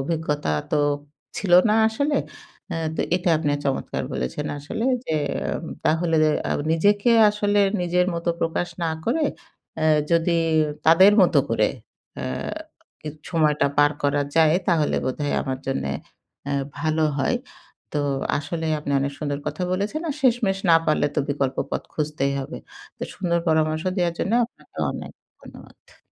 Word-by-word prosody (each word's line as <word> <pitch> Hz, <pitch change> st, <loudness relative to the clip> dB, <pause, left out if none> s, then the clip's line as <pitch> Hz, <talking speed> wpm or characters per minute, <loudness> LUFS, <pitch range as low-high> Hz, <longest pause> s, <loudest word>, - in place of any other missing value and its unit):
অভিজ্ঞতা 150 Hz, -, -2 dB, 0.2 s
তো 150 Hz, -, +3 dB, 0.6 s
ছিল 185 Hz, -4 st, -2 dB, 0.2 s
না -, -, +4 dB
আসলে। 285 Hz, +6 st, 0 dB, 0.5 s
এ্যা 165 Hz, -, -2 dB, 0.2 s
তো -, -, 0 dB, 0.2 s
এটা 180 Hz, -1 st, -1 dB
আপনি 150 Hz, -2 st, 0 dB
চমৎকার 135 Hz, -1 st, -2 dB
বলেছেন 65 Hz, 0 st, -3 dB
আসলে 160 Hz, +11 st, -4 dB, 0.2 s
যে, 160 Hz, -, -2 dB, 0.2 s
এ্যাম -, -, -3 dB, 0.2 s
তাহলে 165 Hz, +1 st, +2 dB, 0.3 s
আ -, -, -3 dB, 0.2 s
নিজেকে 205 Hz, +7 st, +3 dB, 0.2 s
আসলে 205 Hz, 0 st, 0 dB, 0.2 s
নিজের 180 Hz, +1 st, +1 dB
মত 170 Hz, +1 st, -5 dB
প্রকাশ 165 Hz, +1 st, -1 dB, 0.2 s
না 160 Hz, -, 0 dB
করে, 300 Hz, +6 st, +1 dB, 0.5 s
অ্যা 155 Hz, -, +1 dB, 0.2 s
যদি 170 Hz, 0 st, +3 dB, 0.5 s
তাদের 185 Hz, +5 st, +7 dB
মতো 180 Hz, -, +4 dB
করে -, -, +2 dB, 0.5 s
এ্যা -, -, -3 dB, 0.7 s
কিছু 155 Hz, 0 st, -7 dB
সময়টা 150 Hz, -4 st, +2 dB
পার 145 Hz, 0 st, +6 dB
করা 145 Hz, 0 st, +2 dB
যায়, 160 Hz, 0 st, +5 dB
তাহলে 160 Hz, -4 st, +2 dB
বোধহয় 145 Hz, +3 st, -2 dB
আমার 130 Hz, -2 st, -3 dB
জন্যে 135 Hz, -, -1 dB, 0.5 s
অ্যা 140 Hz, -, -3 dB, 0.3 s
ভালো 155 Hz, +1 st, +1 dB
হয়। 245 Hz, -, +1 dB, 0.6 s
তো, 150 Hz, -, 0 dB, 0.4 s
আসলে 160 Hz, +2 st, -4 dB
আপনি 140 Hz, -1 st, -3 dB
অনেক 140 Hz, +1 st, -1 dB
সুন্দর 145 Hz, -2 st, -2 dB
কথা 185 Hz, -, -3 dB
বলেছেন। 205 Hz, +11 st, -1 dB
আর 285 Hz, -, -2 dB
শেষমেশ 230 Hz, -6 st, +2 dB
না 165 Hz, -, +8 dB
পারলে 155 Hz, -1 st, +2 dB
তো -, -, 0 dB
বিকল্প 135 Hz, -2 st, -1 dB
পথ -, -, -2 dB
খুঁজতেই 150 Hz, -3 st, -1 dB
হবে। 135 Hz, -, -6 dB, 0.4 s
তো, -, -, -10 dB
সুন্দর 170 Hz, -2 st, 0 dB
পরামর্শ 155 Hz, 0 st, +1 dB
দেওয়ার 175 Hz, -2 st, +1 dB
জন্য 205 Hz, -, -1 dB
আপনাকে 235 Hz, -, -18 dB
অনেক -, -, -7 dB, 0.3 s
ধন্যবাদ। -, -, -16 dB
160 Hz, 150 wpm, -23 LUFS, 145-185 Hz, 0.7 s, না